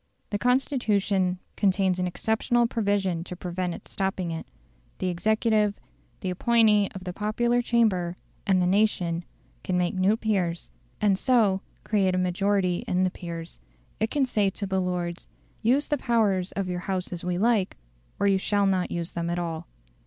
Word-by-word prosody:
The 205 - -1
Constitution 210 -7 +1 0.2
contains 190 -2 +2
an 180 - 0
exceptional 225 +6 +1
provision 200 -7 0
to 180 - -7
prevent 180 0 -3
it - - -12
stopping 190 -3 -2
it. 160 - -5 0.5
The 185 - -1
executive, 215 +3 +1 0.4
the 185 - -2
appointee 210 +1 +3
of 190 - -7
the 180 -1 -5
popular 235 +4 +1
chamber 200 -8 +1 0.3
and 190 -2 +4
the 180 - +2
nation, 180 -3 +1 0.4
can 185 - 0
make 180 -1 +1
new 190 +4 +2
peers, 185 -7 -1 0.3
and 200 -2 +2
so 215 -7 +3 0.2
create 195 -4 +2
a - - +1
majority 185 0 +1
in 180 +1 +1
the 185 - +1
peers; 170 -2 -7 0.4
it 220 - +1
can 280 0 +1
say 210 -6 +1
to 200 +1 -5
the 190 -1 0
Lords, 175 -1 -3 0.3
"Use 255 +6 +3
the 295 - -1
powers 205 -7 +1
of 195 -2 -2
your 180 -1 -2
House 185 0 -3
as 175 - -5
we 180 0 -1
like, 215 -2 +2 0.4
or - - +1
you 195 -1 +4
shall 200 +1 +1
not 190 -2 +1
use 170 0 -3
them 170 0 -3
at 175 - -1
all. 170 -1 -4
190 Hz, 170 wpm, -26 LUFS, 180-215 Hz, 0.5 s, and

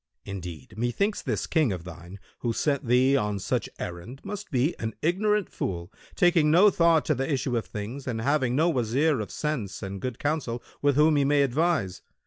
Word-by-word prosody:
Indeed, 90 -7 -7
methinks 200 - 0
this - - -2
King 155 -8 +2
of 90 -3 -4
thine 85 +3 -10 0.2
who 120 -2 -1
sent 140 0 0
thee 130 +3 +4
on 105 -5 0
such 95 - -2
errand 90 +10 -7
must 205 0 -6
be 135 +5 +1
an 110 -1 -4
ignorant 205 +4 +2
fool, 85 -1 -4 0.2
taking 170 -4 +4
no 185 +6 +6
thought 170 -3 +3
to 155 - +2
the 135 +2 -2
issue 130 -2 0
of 115 - -2
things 110 +7 -6
and 115 -3 -2
having 130 0 +1
no 160 +5 +3
Wazir 130 +3 +1
of 105 - -4
sense 115 -11 -3
and 95 0 -5
good 125 -3 -4
counsel, 145 -6 -2 0.2
with 145 -1 +3
whom 150 +1 +4
he 140 - +3
may 140 +1 +3
advise. 140 - 0
130 Hz, 190 wpm, -26 LUFS, 105-155 Hz, 0.2 s, no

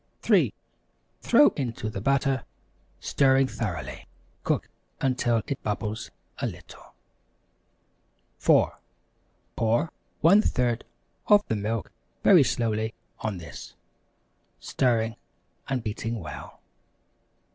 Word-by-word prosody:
3. - - +4 0.7
Throw 295 - +6
into 120 -5 -4
the 100 -2 -4
butter, 135 +1 +1 0.6
stirring 135 -1 +3
thoroughly. 95 - -5 0.4
Cook - - 0 0.3
until 120 -4 +1
it 140 - -4
bubbles 105 +1 -3 0.3
a - - 0
little. - - -11 1.4
4. - - +3 0.8
Pour 115 +8 +1 0.3
1/3 125 - +4 0.5
of 205 -1 +5
the 110 - +1
milk 110 +1 -3 0.3
very - - +7
slowly 110 -1 -1 0.2
on 105 -4 -3
this, 85 - -10 0.8
stirring 115 -3 0 0.5
and 130 -4 -1
beating 115 +1 -3
well. 80 -7 -9
115 Hz, 90 wpm, -26 LUFS, 110-135 Hz, 1.4 s, very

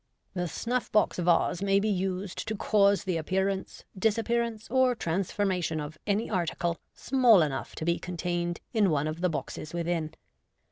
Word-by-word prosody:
The 180 -1 -2
snuff 245 +8 -2
box 210 -3 +2
vase 175 +1 +2
may 195 0 +3
be 210 - 0
used 190 -1 -2
to 220 - -2
cause 200 -1 +3
the 185 -3 -1
appearance, 190 +4 -2
disappearance, 225 +2 0
or 260 -1 +3
transforma 190 0 -1
tion 160 -1 -1
of 150 +1 -7
any 210 +2 +1
article 170 -3 -1 0.2
small 245 -8 +5
enough 135 -4 -4
to 155 - -4
be 170 0 +1
con 180 -1 -6
tained 175 0 -1 0.2
in 210 -4 +3
one 150 -2 +1
of 155 +2 -4
the 180 - +2
boxes 155 0 -5
within. 170 -2 -2
185 Hz, 170 wpm, -28 LUFS, 170-210 Hz, 0.2 s, small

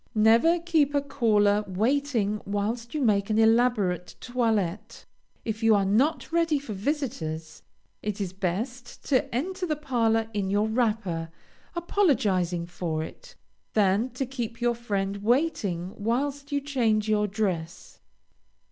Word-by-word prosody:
Never 230 +11 +5
keep 320 -4 +1
a 285 - +3
caller 210 -6 +2
waiting 220 +1 0
whilst 225 +5 -3
you 300 - 0
make 200 -3 +2
an 215 - +1
elaborate 220 -6 +2
toilette. 220 -7 -1 0.4
If 220 0 -3
you 225 -1 +5
are 200 -1 +2
not 250 +15 +1
ready 330 -2 +2
for 275 -6 -6
visitors, 195 - -3 0.4
it 210 -1 -3
is 190 -3 -3
best 230 +7 -4
to 275 -1 +2
enter 360 +7 -2
the 305 - 0
parlor 230 -6 +1
in 200 -2 -1
your 205 +2 +2
wrapper, 215 -8 -1 0.5
apologizing 210 - +1
for 170 -2 -3
it, - - -11 0.4
than 210 +3 +2
to 270 - -1
keep 240 -3 -5
your 240 0 +2
friend 200 -4 -2
waiting 205 - 0
whilst 275 +7 -2
you 285 0 0
change 230 -7 +1
your 210 -1 +2
dress. 185 -5 -3
225 Hz, 135 wpm, -27 LUFS, 200-270 Hz, 0.5 s, Never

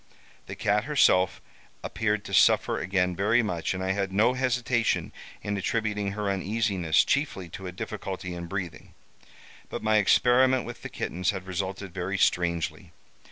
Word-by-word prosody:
The - - -6
cat 105 +1 +1
herself 130 -11 +3 0.4
appeared 105 -2 -1
to - - -8
suffer - - +4
again 90 -1 0
very 110 +6 +2
much, 90 -3 -2
and 95 - -4
I 95 - 0
had 100 -1 -1
no 110 +6 +3
hesitation 125 -2 0 0.3
in 100 - -2
attributing 105 -1 -1
her 105 0 -3
uneasiness 100 -4 +1
chiefly 140 - -1
to 95 +2 -8
a - - -5
difficulty 90 0 -5
in 85 -1 -6
breathing; 90 -2 -6 0.7
but - - -5
my 110 0 +3
experiment 125 +5 +4
with 120 - -8
the - - -6
kittens 90 +3 -2
had 95 -3 -3
resulted 95 0 -4
very 95 +1 -3
strangely. 85 -3 0
100 Hz, 155 wpm, -27 LUFS, 90-110 Hz, 0.7 s, suffer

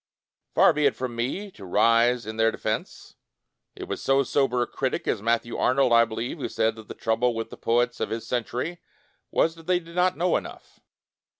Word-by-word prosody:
Far - - +6
be 150 -1 +3
it 140 - 0
from 125 -2 -4
me 140 - -3
to 105 - -14
rise 115 +5 +3
in 110 +1 -6
their 115 0 +3
defense. 110 -1 -5 0.6
It - - -8
was - - -5
so 135 +1 +3
sober 130 -3 +1
a - - -2
critic 130 +2 -3
as 105 - 0
Matthew 115 +1 0
Arnold, 130 -1 +2
I 115 0 +6
believe, 115 +7 -5
who - - -3
said 110 0 0
that 110 -1 -11
the - - -8
trouble 115 +2 0
with 115 0 -4
the - - -9
poets 120 +1 +1
of - - -2
his 115 0 -4
century 125 +7 -3 0.5
was 160 - +2
that 165 -1 -16
they 180 -1 +3
did 170 0 -14
not 180 +1 +2
know 175 0 +2
enough. - - -10
120 Hz, 205 wpm, -25 LUFS, 115-140 Hz, 0.6 s, Far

